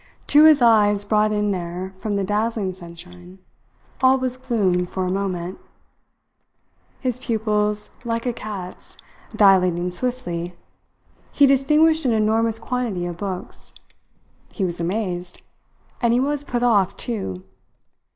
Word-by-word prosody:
To 300 +1 +6
his 305 -5 +6
eyes, 205 -3 +4
brought 215 0 +2
in 210 -1 0
there 180 +1 -5
from 205 +2 -3
the 200 - 0
dazzling 210 -1 -1
sunshine, 180 +1 -13 0.6
all 260 0 +5
was 255 -1 -1
gloom 205 -9 0
for 185 +1 -3
a 180 - -1
moment. 185 -2 -3 1.4
His 250 -2 -2
pupils, 210 -3 -1
like 230 0 -2
a 245 - 0
cat's, 200 -5 -8 0.4
dilating 180 -3 +4
swiftly, 180 -6 -3 0.8
he 285 - +5
distinguished 300 +4 +3
an 245 - +3
enormous 220 +1 +2
quantity 230 -6 -3
of 175 -1 -5
books. 190 -2 -5 0.8
He 195 - -2
was 175 -2 -3
amazed; 180 -1 -3 0.6
and 235 -2 +3
he 245 - +3
was 290 +2 0
put 245 -4 -2
off 200 -5 +2
too. 210 - -3
210 Hz, 130 wpm, -22 LUFS, 185-240 Hz, 1.4 s, To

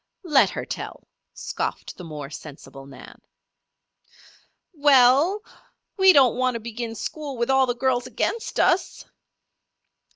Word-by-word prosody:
"Let 300 -6 +4
her - - -6
tell," - - -8 0.3
scoffed - - -5
the 180 - -11
more 150 -3 -8
sensible 140 -2 -11
Nan. 140 - -14 1.5
"We 290 -2 +2
ell! 275 - +4 0.5
We 380 -1 +6
don't 265 -7 +4
want 255 -1 0
to - - -3
begin 230 0 -6
school 285 +4 -6
with 235 +2 0
all 265 -1 +3
the 245 - -1
girls 250 -1 0
against 460 - -3
us." 365 - +1
255 Hz, 130 wpm, -23 LUFS, 225-290 Hz, 1.5 s, We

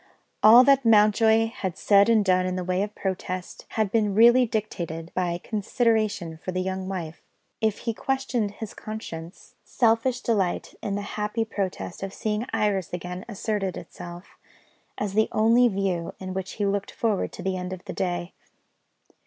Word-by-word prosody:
All 230 +4 +9
that 275 0 +4
Mountjoy 220 0 +5
had 190 -6 -5
said 200 +1 +5
and 220 -3 +4
done 185 -1 +3
in 185 - -2
the 185 - -2
way 185 +1 0
of 210 +1 -3
protest, 185 -1 -4
had 215 -3 +1
been 210 -3 +1
really 240 +3 +6
dictated 170 -7 -4
by 175 -2 -1
consideration 215 -5 0
for 185 - -5
the 185 - -2
young 190 0 -3
wife. 170 -4 -5 0.4
If 220 -2 +1
he 230 - 0
questioned 250 -3 -1
his 215 0 -7
conscience, 175 -5 -8
selfish 235 +1 +1
delight 200 -6 0
in 200 - -2
the 205 - -3
happy 210 +2 -2
prospect 195 -4 -4
of 195 0 -5
seeing 215 +2 -2
Iris 205 -5 0
again 180 +1 -5
asserted 205 -3 -2
itself, 175 +1 -10 0.6
as 205 -2 -3
the 220 +1 +2
only 230 +3 +4
view 190 -5 -2
with 190 - -6
which 185 0 -4
he 205 - -2
looked 200 0 -1
forward 220 -4 -1
to 180 - -8
the 190 0 -1
end 180 0 -4
of 185 -1 -7
the - - -5
day. 175 -1 -3
200 Hz, 170 wpm, -25 LUFS, 185-220 Hz, 0.6 s, All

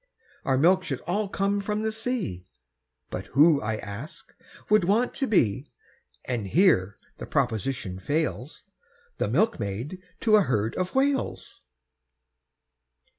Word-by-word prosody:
Our 135 -1 +2
milk 185 +6 +4
should 140 -8 -4
all 200 +4 -1
come 200 +1 0
from 210 +1 -2
the 220 - 0
sea, 220 - -3 0.6
But 95 +2 -5
who, 150 0 +6
I 110 +1 -1
ask, 120 +11 -8 0.3
would 210 -2 +4
want 220 +7 +2
to 270 - -2
be, 130 - +2 0.6
And 120 -6 -2
here 140 - +3 0.2
the - - -7
proposition 120 -6 -1
fails, 145 +3 -2 0.6
The - - +1
milkmaid 130 - -1 0.2
to 215 -1 +5
a - - +5
herd 110 - 0
of 185 +4 -3
Whales? 275 0 -1
155 Hz, 125 wpm, -26 LUFS, -, 0.6 s, who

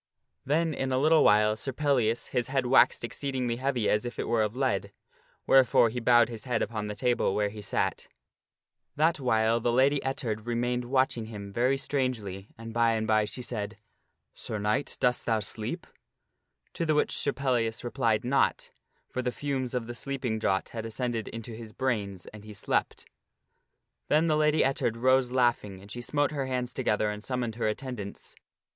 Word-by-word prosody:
Then 160 +3 +1
in 135 -1 -2
a 130 - +2
little 155 +4 +5
while 105 +1 +5
Sir 135 +5 -4
Pellias 125 -5 +1
his 120 -2 0
head 135 -1 0
waxed 125 -1 +4
exceedingly 125 0 -2
heavy 130 -4 0
as 105 - +2
if 120 - -6
it - - -3
were 115 -1 +2
of 105 +1 -1
lead, 130 -1 0 0.5
wherefore 130 -3 +5
he 125 +3 -4
bowed 120 -1 +5
his 115 0 -8
head 120 -3 0
upon 105 -1 -3
the 105 - -5
table 120 -5 +1
where 105 -1 +1
he 105 +1 -9
sat. 100 - -1
Sir - - -13
Pellias - - -48
That 160 +2 +2
while 115 -3 +2
the 120 +1 +1
Lady 135 +4 +3
Ettard 120 -5 -3
remained 120 +1 -1
watching 130 -3 +1
him 100 -3 -8
very 125 +4 +2
sieepeth. - - -4
strangely, 110 -8 -2
and 115 0 -8
by 115 0 +3
and 110 -1 -1
by 110 -1 +3
she 125 +4 -5
said, 110 -3 -4 0.3
" - - -51
Sir 110 - -5
Knight, 105 +7 -1
dost 125 -1 +1
thou 110 -2 +2
sleep? 105 +1 -5 0.4
" - - -47
To - - -2
the 155 -2 +2
which 150 - +1
Sir 140 - 0
Pellias 120 -5 -1
replied 115 -2 0
not, 135 +2 +1 0.4
for 130 - -3
the 125 -1 -1
fumes 130 -2 -3
of 125 -2 -1
the 120 - -6
sleep 135 +2 -4
ing 110 -2 0
draught 95 -3 0
had 115 -2 -5
ascended 115 0 -3
into 115 0 -7
his 110 -1 -9
brains 105 -8 -2
and 105 -1 -11
he 105 -1 -10
slept - - -1 1.0
Then 155 +2 +3
the 155 -2 +2
Lady 150 0 +3
Ettard 130 -4 0
arose 130 +1 +3
laughing, 120 -6 +1
and 100 +2 -14
she 120 - -5
smote 145 +4 0
her 140 -3 -2
hands 125 -1 -2
together 105 -4 0
and 105 0 -7
summoned 125 -3 -2
her 115 - 0
attendants. 110 -2 -5
120 Hz, 195 wpm, -28 LUFS, 110-130 Hz, 1.0 s, little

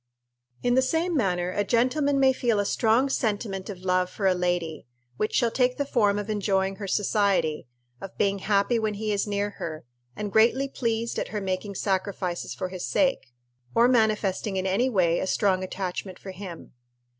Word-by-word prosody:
In 245 - +2
the 260 - +5
same 325 +6 0
manner 180 - 0
a 205 - 0
gentleman 260 +6 +2
may 265 -1 +5
feel 235 -4 +1
a 205 - +1
strong 230 +6 +2
sentiment 205 -6 -2
of 190 -3 -7
love 185 -1 +1
for 195 +2 -4
a 190 - +5
lady, 175 -5 -2 0.3
which 215 - -1
shall 235 -3 +2
take 250 0 +1
the 285 - 0
form 210 -7 +2
of 205 0 -3
enjoying 195 -2 0
her 200 - -5
society, 195 - +1 0.3
of 195 - -9
being 200 -1 +1
happy 200 +4 +2
when 215 -1 -1
he 215 +1 -2
is 205 0 0
near 205 0 -1
her, 155 -4 -5 0.3
and 210 -1 -4
greatly 240 +6 +4
pleased 230 -3 -2
at - - -2
her 210 - -3
making 195 +1 -3
sacrifices 190 -2 -2
for 185 - -4
his 185 -1 -6
sake, 270 - +1 0.5
or 235 +1 +6
manifesting 215 -4 +1
in 185 - -1
any 205 +7 +2
way 175 -7 +2
a - - -2
strong 190 -2 +1
attachment 185 0 -4
for 190 - -9
him. 185 -3 -9
205 Hz, 185 wpm, -26 LUFS, 185-230 Hz, 0.5 s, or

